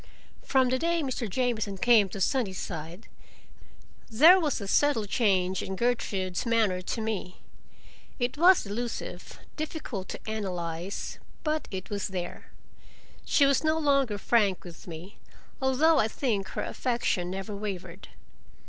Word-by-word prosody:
From 260 -2 +2
the 260 +1 +1
day 335 +1 +1
Mr. 255 -5 -3
Jamieson 220 -3 -1
came 215 -1 +5
to 195 - -7
Sunnyside 185 - -2 1.0
there 315 +11 +7
was 300 -7 0
a 200 - -6
subtle 260 -1 +2
change 190 -4 +1
in 190 - -4
Gertrude's 195 -5 -1
manner 220 -6 +1
to 225 - -3
me. 215 -4 -4 0.7
It 245 +1 -1
was 350 +1 +5
elusive, 230 +4 -5 0.2
difficult 300 - -5
to - - -5
analyze, 180 -4 -4 0.2
but 310 0 -1
it 190 0 -6
was 200 -1 -2
there. 180 -2 -6 0.8
She 285 - +4
was 275 +1 +3
no 315 0 +2
longer 275 -8 +2
frank 205 -3 +2
with 175 0 -12
me, 175 +4 -9 0.4
although 275 +4 +4
I 220 - +3
think 220 -5 -1
her - - -4
affection 235 -8 -1
never 195 +2 -5
wavered. 200 -3 -6
220 Hz, 135 wpm, -28 LUFS, 190-265 Hz, 1.0 s, there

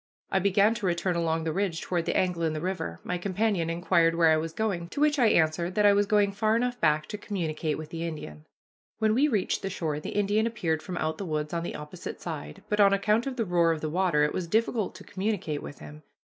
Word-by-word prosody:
I 190 - +3
began 200 +3 +3
to 230 -4 -3
return 175 +1 0
along 165 -1 0
the 160 -1 -2
ridge 185 -3 -1
toward 170 -2 -2
the - - 0
angle 180 -2 0
in 160 -1 +1
the 155 - -3
river. 155 - -3
My 180 - -3
companion 195 -2 0
inquired 170 -1 +2
where 165 -1 +5
I 155 - +4
was 160 +1 -3
going; 175 -3 -2
to - - -6
which 295 -1 +3
I 240 - +5
answered 170 0 +2
that 210 - +3
I 205 - +7
was 205 0 +2
going 205 -1 +3
far 215 +2 +1
enough 245 +1 -1
back 155 -1 +3
to 210 - -5
communicate 160 -7 -2
with 155 -1 -7
the 165 0 -5
Indian. 75 - -8 0.5
When 220 -1 +2
we 275 +6 +4
reached 215 -9 0
the 195 - -3
shore 155 -5 -2
the - - -6
Indian 205 +2 +2
appeared 165 -9 -1
from 180 +1 -6
out 155 0 -2
the 200 - -3
woods 150 -1 -2
on 170 - -1
the 170 - -5
opposite 150 0 -7
side, 75 +1 -7
but 210 - -1
on 200 -1 +6
account 210 +5 +2
of 265 - -3
the 230 -3 -1
roar 170 -2 +3
of 160 -2 -2
the 155 - -3
water 175 -4 +2
it 150 - +1
was 180 -2 -3
difficult 220 +1 0
to 190 - -11
communicate 190 -7 -2
with 145 - -9
him. 150 +1 -11
180 Hz, 250 wpm, -27 LUFS, 160-205 Hz, 0.5 s, I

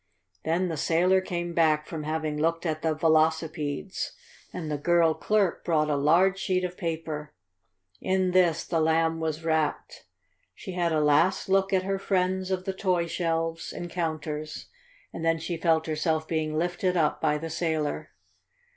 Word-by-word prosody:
Then 170 +4 +1
the 165 -3 -3
sailor 180 +5 +3
came 175 -2 -4
back 155 -2 +3
from 155 -2 -6
having 155 -1 -2
looked 165 +3 0
at 155 -1 -1
the 160 -1 0
velocipedes, 160 +1 0 0.4
and 160 -4 -5
the 145 - -2
girl 170 +1 +3
clerk 205 +1 0
brought 155 -2 +1
a - - +2
large 175 +7 +3
sheet 185 -1 0
of 180 0 -3
paper. 160 - -4 0.6
In 185 -1 +1
this 175 -3 +3
the 165 - 0
Lamb 160 +1 +2
was 160 0 -3
wrapped. 160 -2 -1 0.5
She - - -8
had 175 -2 0
a 155 - +2
last 150 +7 +3
look 195 0 +3
at 190 -1 +2
her 195 0 -1
friends 185 -1 0
of 185 -1 -2
the 195 - -2
toy 185 -3 0
shelves 165 -1 -2
and 175 -1 -6
counters, 155 -3 -4 0.4
and - - -6
then 165 0 +2
she 165 +2 -4
felt 160 -1 +2
herself 155 0 -1
being 155 -1 -1
lifted 175 +2 0
up 155 -3 +1
by 150 - +2
the 165 +1 -6
sailor. 160 -3 -2
165 Hz, 165 wpm, -27 LUFS, 155-180 Hz, 0.6 s, sailor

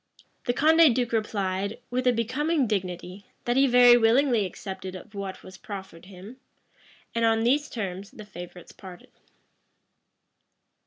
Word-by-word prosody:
The 245 - +1
Condé 320 +1 +5
duke 245 0 -1
replied, 200 -2 -2
with 255 +1 -1
a - - +6
becoming 265 +6 0
dignity, 185 -2 -4 0.2
that 240 - 0
he 275 +1 +4
very 245 -1 +7
willingly 235 -2 +3
accepted 190 0 -8
of 205 +4 -11
what 195 -2 -6
was 185 0 -13
proffered 190 -4 -9
him: 195 +6 -12 0.8
and 230 - -1
on 225 0 +2
these 285 +5 +1
terms 195 -3 -5
the 215 - -12
favorites 180 -3 -11
parted. 185 -2 -13
220 Hz, 140 wpm, -26 LUFS, 190-245 Hz, 0.8 s, very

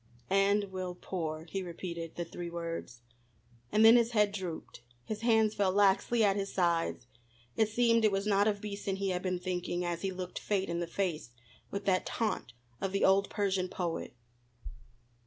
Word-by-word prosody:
"And 200 0 +3
will 185 -1 -4
pour," 160 -3 -4
he 195 +3 -4
repeated 170 -2 -6
the 175 - -3
three 170 +1 -6
words. 165 -8 -5 0.7
And 215 +1 +5
then 225 +2 +9
his 235 0 +2
head 210 -2 +4
drooped, 180 - -6 0.2
his 215 0 -4
hands 220 -2 +3
fell 200 -3 +2
laxly 205 +4 +3
at 200 -2 +4
his 200 -1 -2
sides. 170 -8 0 0.5
It 220 -1 +2
seemed 230 0 +3
it 215 - +5
was 195 +1 -1
not 205 0 +3
of 205 -1 0
Beason 200 -2 -3
he 195 0 -1
had 180 -1 -1
been 185 -1 -1
thinking 180 -1 -2
as 170 -1 -2
he 195 - -1
looked 185 -1 -5
Fate 195 -3 -1
in 170 0 -1
the 170 - -2
face 170 -7 -2 0.4
with 200 0 -5
that 185 -2 +2
taunt 220 - -2 0.3
of 195 -1 -2
the 195 - +3
old 195 +1 +4
Persian 195 -3 0
poet. 170 -8 -4
195 Hz, 180 wpm, -31 LUFS, 175-205 Hz, 0.7 s, then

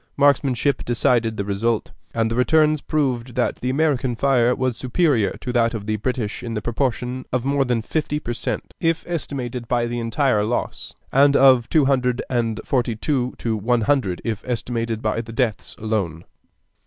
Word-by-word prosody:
Marksmanship 140 -1 +2
decided 120 -2 +1
the 100 - -2
result, 105 +3 -1 0.2
and 115 -1 0
the - - 0
returns 155 +3 +3
proved 130 -5 -1
that 125 - 0
the 125 - -3
American 135 -3 +1
fire 125 -1 +3
was 130 -2 -1
superior 130 - +1
to 125 - -4
that 115 -1 +2
of 105 -2 -5
the 110 0 0
British 115 -1 -3
in 115 -1 -5
the 105 - -2
proportion 125 +1 -2
of 125 0 -1
more 140 0 +2
than 120 -3 -1
fifty 150 +2 -1
per 120 -5 -4
cent, - - -4
if 165 -1 0
estimated 130 -8 -4
by 120 0 +1
the 120 0 -3
entire 115 -1 +1
loss, 115 +3 -3 0.2
and 140 +1 +5
of 130 -3 +5
two 155 -3 +4
hundred 125 -2 +1
and 115 -3 0
forty 120 -3 0
two 125 +1 -1
to 115 -2 -1
one 115 +3 +1
hundred 105 -8 0
if 110 -3 -3
estimated 115 -2 -2
by 110 +1 0
the 115 0 -10
deaths 115 -2 -2
alone. 100 -7 -2
120 Hz, 180 wpm, -22 LUFS, 115-135 Hz, 0.2 s, and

